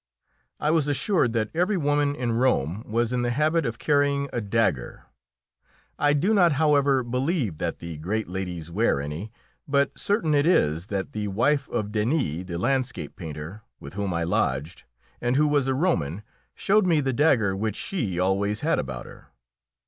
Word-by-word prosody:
I 150 - +1
was 160 -3 +2
assured 145 - +1
that 110 -2 -1
every 180 +5 +1
woman 145 -2 +1
in 125 -4 -2
Rome 115 - +1
was 120 +1 +1
in 125 - 0
the 120 - 0
habit 155 +4 +1
of 115 0 -4
carrying 140 0 +1
a 120 - -1
dagger. 100 - -1 1.0
I 145 0 +3
do 175 +10 +2
not, 175 -6 +5
however, 140 -2 +3
believe 125 - -1
that - - -2
the 85 -2 -7
great 105 +7 -2
ladies 90 -3 -5
wear 100 -5 +1
any, 75 +9 -5 0.4
but 140 0 +2
certain 200 -7 0
it 145 +2 +3
is 80 - +2
that 100 +4 -3
the 105 -6 -3
wife 135 +8 +1
of 105 -1 -2
Denis, 105 - 0
the 85 -2 -5
landscape 130 +6 -1
painter, 80 +3 -7 0.2
with - - -10
whom 100 -1 -2
I 85 -1 -1
lodged, 75 -1 -1 0.4
and 120 +1 +1
who 150 +2 +4
was 145 -3 +2
a 135 - +1
Roman, 100 - 0 0.3
showed 205 -1 +2
me 165 -3 +3
the 135 -2 0
dagger 120 -9 +3
which 110 +1 -2
she 115 - -3
always 100 +3 0
had 160 - +1
about 65 -2 -5
her. - - -14
120 Hz, 175 wpm, -25 LUFS, 95-145 Hz, 1.0 s, not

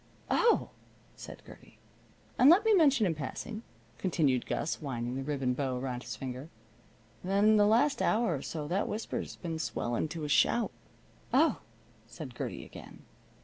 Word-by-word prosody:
"Oh!" 465 0 +3 0.4
said - - -10
Gertie. - - -15 0.6
"And 260 - +8
let 380 +7 +6
me 445 - +5
mention 280 - +5
in 175 - +1
passing," 160 +9 -6 0.4
continued 150 -9 +1
Gus, 165 - -2
winding 125 -4 -3
the 135 - -3
ribbon 135 -2 -1
bow 130 -1 -2
around 125 -1 -4
his 115 -2 -6
finger, 130 +5 -6 0.7
"that 195 +2 0
in 215 0 +6
the 205 0 +5
last 245 +7 +3
hour 220 -4 +2
or 135 - -5
so 150 -1 -5
that 185 +6 0
whisper 220 +2 -3
has - - -7
been 165 -3 -5
swelling 120 +2 -2
to 160 0 -6
a - - -2
shout." 230 +10 +3 0.6
"Oh!" - - +3 0.5
said - - -9
Gertie - - -5
again. - - -12
160 Hz, 165 wpm, -31 LUFS, 130-215 Hz, 0.7 s, And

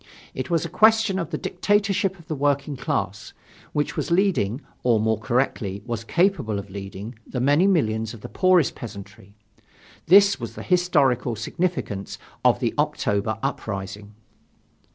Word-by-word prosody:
It 130 - -4
was 170 -1 +1
a - - -5
question 220 +1 +4
of 165 -4 -3
the 155 - -3
dictatorship 200 +1 0
of 165 -3 -17
the - - -2
working 140 0 0
class, 110 - -3 0.4
which 150 0 -1
was - - -2
leading, 170 - +1 0.2
or, 120 -3 +3
more 110 0 +1
correctly, 110 -4 -1
was 115 -2 -4
capable 170 - +1
of 100 0 -7
leading 100 +3 -7
the 125 - -4
many 145 +9 +4
millions 110 - +1
of 110 - -14
the - - -7
poorest 185 -5 +3
peasantry. 100 -2 -10 0.7
This 200 +3 +6
was - - -6
the - - -7
historical 145 -10 +2
significance 115 - -3 0.3
of - - +4
the - - 0
October 105 +1 0
uprising. 100 0 -4
130 Hz, 150 wpm, -24 LUFS, 105-180 Hz, 0.7 s, This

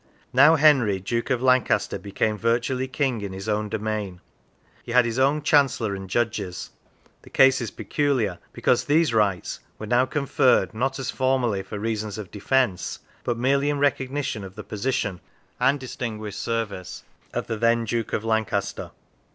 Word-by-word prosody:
Now, 145 +6 +7
Henry, 135 -10 +4
Duke 115 +7 -2
of 130 -2 0
Lancaster, 125 -6 +2
became 100 +2 -1
virtually 120 +4 0
King 130 -3 -1
in 100 -2 -5
his 95 +2 -7
own 105 0 -1
domain; 105 -4 -3 0.6
he 120 - -6
had 125 -1 +5
his 115 +2 -2
own 140 +3 +2
Chancellor 135 -8 +3
and 95 -1 -7
Judges. 100 -5 -2 0.5
The - - -16
case 135 -1 +5
is 115 - -3
peculiar, 110 - -1
be - - -12
cause - - +3
these 150 -3 +3
rights 100 -5 0 0.2
were 110 - -6
now 125 +4 +2
conferred, 135 -4 +2
not, 130 +4 -1
as 130 -2 -3
formerly, 130 -6 +1
for 105 - -7
reasons 110 -1 -3
of 105 -4 -8
defence, 110 -2 0 0.3
but 120 - -1
merely 140 +4 +2
in 145 - 0
recognition 140 -5 -1
of 95 0 -10
the 105 - -7
position 105 -4 -2 0.4
and 140 +2 +3
distinguished 110 -5 -5
services 110 -5 -4 0.3
of - - -3
the 115 - -3
then 115 +1 +2
Duke 115 0 -2
of 105 - -1
Lancaster. 110 -2 -1
115 Hz, 165 wpm, -24 LUFS, 105-130 Hz, 0.6 s, Now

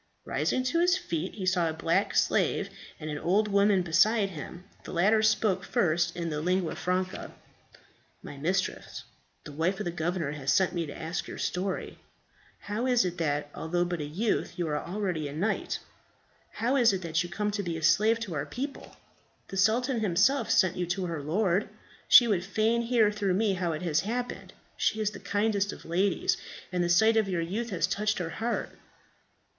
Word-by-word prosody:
Rising 255 - 0
to 260 +6 +1
his 355 +2 +4
feet, 170 - -4
he 195 -4 -4
saw 180 -3 +2
a - - -3
black 160 - 0
slave, - - +1 0.3
and 155 0 -5
an 150 - -4
old 205 +5 +2
woman 200 -1 +3
beside 195 +5 +3
him. 175 +2 -8 0.2
The - - -8
latter 205 +6 +3
spoke 210 -3 +2
first 170 -1 +1
in 170 -1 -2
the 150 0 -2
lingua 180 0 0
franca, 185 +1 -3 0.9
"My - - -8
mistress, 180 +7 -2 0.4
the 150 - -9
wife 165 +7 -1
of - - -2
the 175 - -1
governor, 170 -2 -2
has 140 -2 -2
sent 190 +2 +3
me 170 -3 -2
to 145 - -8
ask 165 +2 -4
your - - -7
story. 185 +1 -3 0.6
How 215 +5 -2
is 245 -5 +3
it 175 -1 -3
that, 145 -2 -1
although 175 +2 -1
but 175 -2 -3
a - - -3
youth, 195 +11 -1
you 175 -2 -1
are 150 -1 -1
already 180 -5 -2
a 140 - -7
knight? 205 +8 -1 0.8
How 245 +5 0
is 235 -5 +5
it 190 -1 -3
that 165 -1 0
you 175 - -4
come 210 +4 -2
to 205 0 -2
be 170 -4 -3
a 160 - -7
slave 220 +7 +4
to 200 -7 -4
our 145 -1 -3
people? 270 - -6 0.5
The 195 - -5
sultan 235 +6 +2
himself 215 +7 +2
sent 185 -4 +3
you 180 -1 -1
to 180 +2 -1
her 165 -4 -4
lord. 185 +5 0 0.4
She 240 - +8
would 195 -6 +1
fain 220 +4 +1
hear 230 -3 +3
through 200 -3 0
me 205 0 +2
how 180 -3 -1
it 155 - -5
has 165 -2 +1
happened. 245 +5 -4 0.2
She 220 - +1
is 210 -1 0
the - - -9
kindest 205 -1 0
of - - -11
ladies, 185 +4 +1 0.3
and 180 -1 0
the 175 - 0
sight 220 +6 +5
of 215 -3 +2
your 175 -3 0
youth 210 +8 -3
has 175 -6 0
touched 210 +3 -1
her 165 -2 -3
heart." 230 +6 -2
185 Hz, 195 wpm, -28 LUFS, 170-215 Hz, 0.9 s, She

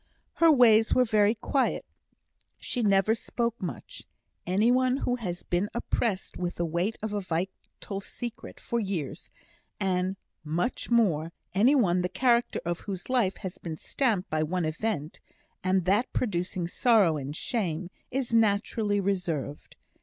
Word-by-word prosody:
Her 330 -1 +6
ways 225 -5 +5
were 255 - +5
very 215 -1 +3
quiet; 265 +4 0 0.7
she 245 - -2
never 200 0 +4
spoke 235 0 -2
much. 160 - -7 0.4
Any 205 +6 +3
one 255 +1 +3
who 250 -2 -1
has 180 -7 -4
been 180 +4 0
oppressed 230 -4 -1
with 180 -1 -3
the 175 - -1
weight 170 +7 -1
of 220 -1 -2
a 205 - -1
vital 190 +2 -4
secret 240 +3 -7
for 235 - -2
years, 190 - -4 0.5
and 185 -1 0 0.3
much 170 +10 -2
more 170 -9 +2 0.2
any 230 +10 +5
one 180 -9 +3
the 180 - -1
character 240 0 +2
of 175 0 -1
whose 195 +3 -6
life 230 -7 +2
has 185 - -5
been 160 -2 -6
stamped 220 - 0
by 155 0 +1
one 170 +2 -1
event, 155 -1 -3 0.4
and 185 -1 +2
that 205 +6 +2
producing 180 -5 -1
sorrow 200 -5 +3
and 140 +1 -5
shame, 180 -4 -2 0.2
is 255 -2 -1
naturally 210 -1 +2
reserved. 175 -7 -2
195 Hz, 145 wpm, -28 LUFS, 175-230 Hz, 0.7 s, Her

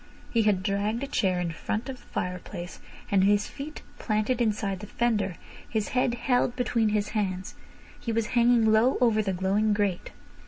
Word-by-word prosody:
He 230 - +3
had 205 -4 +2
dragged 205 +5 0
a - - -2
chair 190 -9 +1
in 175 -1 -1
front 215 - -3
of 265 -1 -5
the - - -21
fireplace, 180 0 -5 0.3
and 195 -2 +4
his 205 +1 +3
feet 295 +2 -8 0.2
planted 215 +3 0
inside 205 -4 0
the 210 - -8
fender, 210 -6 0 0.3
his 220 -3 -1
head 250 -1 +1
held 245 0 +1
between 235 -3 +1
his 210 -1 0
hands, 190 -4 -2 0.5
he 230 - -3
was 225 0 0
hanging 235 -2 +4
low 225 +5 +4
over 225 -3 +3
the 200 -2 -1
glowing 195 +4 +1
grate. 205 -4 -1
215 Hz, 180 wpm, -27 LUFS, 195-235 Hz, 0.5 s, and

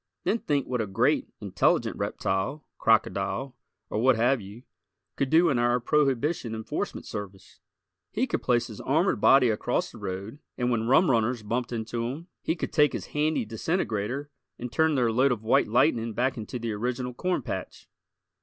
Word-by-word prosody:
Then 230 - +1
think 145 - 0
what 125 -2 -1
a 110 - -2
great, 95 - +1
intelligent - - +1
reptile, 95 +11 -2
crocodile, 110 +3 +1 0.3
or - - -2
what 130 +1 +5
have 120 +2 +2
you, 100 +5 -11 0.5
could 140 - -1
do 165 +3 +5
in 130 -5 +1
our 120 +1 +2
Prohibition 135 -1 +1
Enforcement 110 0 -4
Service! 95 -2 -8 0.5
He - - 0
could - - -2
place - - +2
his - - -9
armored - - +1
body 130 -4 +6
across 105 - -1
the - - -12
road, 100 +8 -5 0.2
and 125 -1 0
when 115 -1 0
rum 135 +5 +5
runners 115 0 +1
bumped 120 +4 -2
into 115 0 -3
him 155 +8 -7
he 160 - -1
could - - -5
take 150 -2 +4
his - - -4
handy 155 - +1
disintegrator 140 - -2 0.3
and 125 0 -6
turn 160 +4 +2
their 120 -4 +2
load 130 +4 +3
of 115 -3 -2
white 135 +5 +3
lightning 115 0 +2
back 130 +5 0
into 115 +2 -5
the 115 -1 -3
original 125 +3 -3
corn 180 0 -1
patch! 100 -6 -6
125 Hz, 175 wpm, -27 LUFS, 110-140 Hz, 0.5 s, body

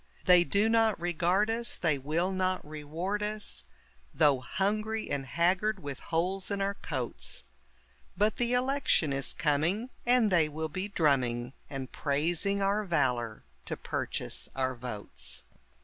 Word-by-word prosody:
They 180 -1 +7
do 200 +4 +2
not 225 -3 +3
regard 175 +5 +1
us, 235 +1 0
they 155 -5 0
will 160 +7 0
not 185 -3 -1
reward 160 +7 -3
us, 210 - 0 0.5
Though 145 -3 +4
hungry 215 - -1
and 140 -2 -2
haggard 185 - +1
with 140 -2 -5
holes 180 +4 -1
in 200 -1 -2
our 200 0 0
coats; 120 - -4 0.7
But 210 +1 +2
the 240 0 +1
election 250 - +2
is 135 -1 +2
coming 160 - 0
and 240 -3 +4
they 165 -4 +4
will 160 +1 -4
be 185 +6 -3
drumming 130 -9 +1 0.2
And 135 -2 -5
praising 170 +7 0
our 200 +2 +1
valor 125 - 0 0.2
to - - -4
purchase - - -2
our 130 -1 0
votes. 110 - -5
175 Hz, 140 wpm, -30 LUFS, 140-205 Hz, 0.7 s, They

